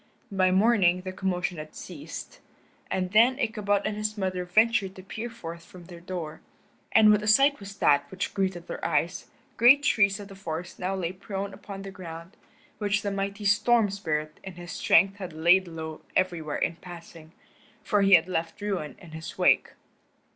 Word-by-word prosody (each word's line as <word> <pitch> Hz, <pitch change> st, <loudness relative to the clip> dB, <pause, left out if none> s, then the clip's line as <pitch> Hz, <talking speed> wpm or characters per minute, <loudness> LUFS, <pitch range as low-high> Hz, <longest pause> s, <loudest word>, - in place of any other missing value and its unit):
By 185 Hz, -1 st, +3 dB
morning 190 Hz, -2 st, +3 dB
the 185 Hz, 0 st, -6 dB
commotion 180 Hz, -2 st, -2 dB
had 155 Hz, 0 st, -9 dB
ceased, -, -, -9 dB, 0.5 s
and 185 Hz, -1 st, -2 dB
then 235 Hz, +5 st, +5 dB
Ichabod 210 Hz, -5 st, 0 dB
and 215 Hz, -, -1 dB
his 215 Hz, +1 st, -3 dB
mother 185 Hz, -2 st, -2 dB
ventured 205 Hz, 0 st, +2 dB
to 185 Hz, -, -11 dB
peer 225 Hz, +5 st, -6 dB
forth 170 Hz, -8 st, -9 dB
from 175 Hz, 0 st, -14 dB
their 175 Hz, -1 st, -11 dB
door. 170 Hz, -3 st, -6 dB, 0.5 s
And 215 Hz, -1 st, +7 dB
what 210 Hz, 0 st, +3 dB
a 210 Hz, -, -4 dB
sight 275 Hz, +7 st, +5 dB
was 200 Hz, 0 st, -10 dB
that 145 Hz, -5 st, +3 dB
which 190 Hz, 0 st, -4 dB
greeted 190 Hz, -3 st, -2 dB
their -, -, -7 dB
eyes. -, -, -1 dB, 0.3 s
Great 270 Hz, +5 st, +7 dB
trees 200 Hz, -7 st, +3 dB
of 205 Hz, -, -8 dB
the -, -, -10 dB
forest 175 Hz, -2 st, -6 dB
now 190 Hz, +1 st, -2 dB
lay 175 Hz, -3 st, -2 dB
prone 195 Hz, +1 st, -6 dB
upon 195 Hz, -1 st, -9 dB
the 195 Hz, -, -7 dB
ground, 170 Hz, 0 st, -10 dB, 0.4 s
which 205 Hz, -1 st, 0 dB
the 200 Hz, -, -1 dB
mighty 200 Hz, +1 st, -3 dB
Storm 210 Hz, +1 st, +3 dB
Spirit 155 Hz, -5 st, -3 dB
in 190 Hz, -, -8 dB
his 175 Hz, -1 st, -9 dB
strength 195 Hz, +5 st, +3 dB
had 185 Hz, -4 st, -7 dB
laid 175 Hz, +4 st, +4 dB
low 160 Hz, -1 st, -7 dB
everywhere 170 Hz, -5 st, 0 dB
in 165 Hz, -, -1 dB
passing, 170 Hz, -2 st, -12 dB, 0.5 s
for 205 Hz, -2 st, +1 dB
he 195 Hz, -1 st, +7 dB
had 170 Hz, 0 st, +3 dB
left 165 Hz, -2 st, -3 dB
ruin 195 Hz, -7 st, -3 dB
in 175 Hz, -4 st, -14 dB
his 160 Hz, 0 st, -8 dB
wake. -, -, +3 dB
190 Hz, 185 wpm, -27 LUFS, 170-205 Hz, 0.5 s, And